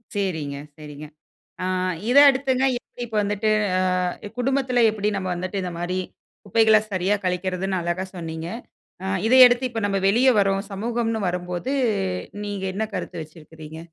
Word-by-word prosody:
சரிங்க, 160 -8 -2 0.2
சரிங்க. 150 -1 -9 0.6
ஆ - - -1 0.4
இத 255 - +2
அடுத்துங்க 265 -1 0
எப்டி 245 - -12
இப்போ 220 -2 -2
வந்துட்டு, 210 +1 0 0.3
ஆ - - +2 0.6
குடும்பத்தில 255 -1 +1
எப்டி 210 -1 -1
நாம 190 -1 -3
வந்துட்டு 185 +3 -3
இந்த 180 -1 -4
மாதிரி 180 +2 -2 0.5
குப்பைகளை 220 +1 +5
சரியா 190 +2 +1
கழிக்கிறதுன்னு 185 +1 -1
அழகா 175 +2 -2
சொன்னீங்க. 165 -1 -5 0.6
ஆ - - -4 0.2
இத 245 - +2
அடுத்து 245 +1 0
இப்போ 225 -2 -4
நாம 195 -1 -1
வெளியே 250 +6 +4
வர்றோம், 195 0 +1
சமூகம்ன்னு 225 +1 -2
வரும்போது 180 +8 -3 0.7
நீங்க 205 -2 -4
என்ன 220 +3 -1
கருத்து 175 -2 -5
வச்சிருக்கிறீங்க? 155 0 -12
195 Hz, 140 wpm, -23 LUFS, 175-225 Hz, 0.7 s, குப்பைகளை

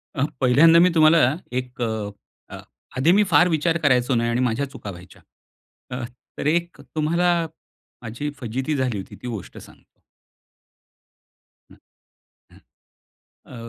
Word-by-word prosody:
अ, 135 - 0 0.2
पहिल्यांदा 150 +7 +6
मी 180 +2 +5
तुम्हाला 160 +1 +6 0.3
एक 125 0 -5
अ, 110 -3 -6 0.4
आधी 145 +6 +4
मी 205 +3 +5
फार 180 -2 +4
विचार 160 +1 +1
करायचो 125 -2 +3
नाही 115 0 +1
आणि 120 +1 0
माझ्या 125 +4 -1
चुका 105 - -9
व्हायच्या. 90 0 -14 0.7
अ, 125 0 -4 0.3
तर - - -5
एक 170 +3 -1
तुम्हाला 170 +2 +1 0.5
माझी 120 +5 -5
फजिती 130 +5 -3
झाली 130 -5 -1
होती 95 - -8
ती - - -7
गोष्ट 110 -6 -7
सांगतो. - - -17 1.7
हं, - - -17 0.7
हं. - - -18 0.9
अ, - - -12
130 Hz, 130 wpm, -22 LUFS, 120-165 Hz, 1.7 s, पहिल्यांदा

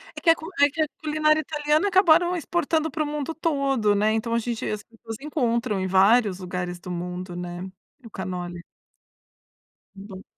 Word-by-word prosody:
É - - -7
que 335 - +3
a 330 - +7
cu 320 - -10 0.2
é 285 - +7
que 315 +3 -3
a 310 - +2
culinária 310 0 +2
italiana 300 +3 +1
acabaram 355 -2 +4
exportando 320 -2 0
pro 305 +2 -1
mundo 295 +1 -3
todo, 275 -9 +1
né? 210 +2 +2
Então, 225 +1 -1
a 235 - +2
gente 235 0 -3
as 210 0 -3
pessoas 225 -1 -10
encontram 240 - 0
em 190 - -1
vários 195 +1 +4
lugares 180 -1 -4
do 180 - -8
mundo, 180 +1 -5
né, 175 +1 -5 0.4
o 230 - -11
cannoli. 180 -3 -5 1.3
Então 195 -1 -10
235 Hz, 175 wpm, -24 LUFS, 190-305 Hz, 1.3 s, a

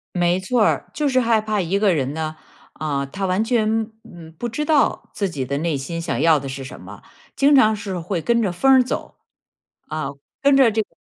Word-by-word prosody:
没 175 0 +2
错 225 +6 0
儿， - - +1
就 300 - 0
是 260 -2 +2
害 230 -2 +3
怕 215 -1 -1
一 185 +3 0
个 200 -3 +3
人 140 -3 -1
呢， 155 0 -4 0.4
啊， 145 -3 -2
他 195 +8 -4
完 185 +3 +1
全， 225 -1 0
嗯， 165 -2 -13
不 240 - -3
知 300 +7 -3
道 300 -2 +1
自 200 -2 -1
己 140 -6 -4
的 140 +2 -2
内 160 -2 -1
心 165 +5 -5
想 165 - -2
要 165 -2 +5
的 135 0 -6
是 135 +1 -6
什 - - -10
么， - - -11 0.3
经 280 +1 +4
常 220 -5 +5
是 200 -3 -5
会 175 +1 -3
跟 235 +6 +2
着 200 -5 0
风 270 +10 +3
儿 260 -1 +6
走。 250 - -5 0.7
啊， 155 -2 -3 0.3
跟 280 0 +4
着 260 -4 +5
这 220 +1 +1
个 - - -8
195 Hz, 240 characters per minute, -21 LUFS, 160-230 Hz, 0.7 s, 儿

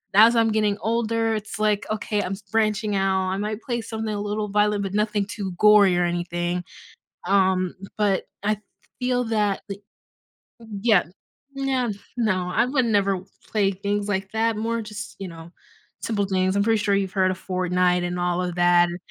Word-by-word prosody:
as 225 +3 +7
I'm 225 -1 +3
getting 210 -1 +1
older, 225 0 0
it's, 215 -1 -6
like, 210 -1 +1
okay, 210 -1 -1
I'm 185 - -4
s 195 - -8
branching 215 -1 +1
out, 190 -1 +1
I 190 - -1
might 210 +2 -3
play 240 -3 -2
something 220 -1 -4
a 205 - -3
little 210 0 -2
violent, 210 0 +2
but 195 0 -4
nothing 210 -1 +1
too 195 -4 -5
gory 210 -3 +6
or 175 - +2
anything, 175 0 -2 0.6
um, 185 -2 +2 0.2
but 205 -3 +1 0.2
I 210 0 +1 0.4
feel 250 0 +1
that 210 -3 0
the 200 0 -6 1.0
yeah, 210 -5 +4 0.5
no 265 -4 0 0.3
no, 185 -6 0
I 235 - +4
would 260 -1 +1
never 200 -3 +2 0.3
play 200 -2 +2
things, 200 +2 -2
like, 195 -1 -2
that, 225 0 +1
more 230 +1 -1
just, 210 -1 -8
you 195 -2 -5
know, 165 0 -11 0.5
simple 205 -3 0
things, 190 0 +1
I'm 200 - +3
pretty 225 -2 +2
sure 200 -2 +2
you've 195 -2 0
heard 185 -2 +2
of 185 - -7
Fortnite, 180 -1 +1
and 180 0 -3
all 175 0 0
of 180 -1 -3
that, 175 0 +5
s 175 - -5
205 Hz, 180 wpm, -24 LUFS, 185-220 Hz, 1.0 s, as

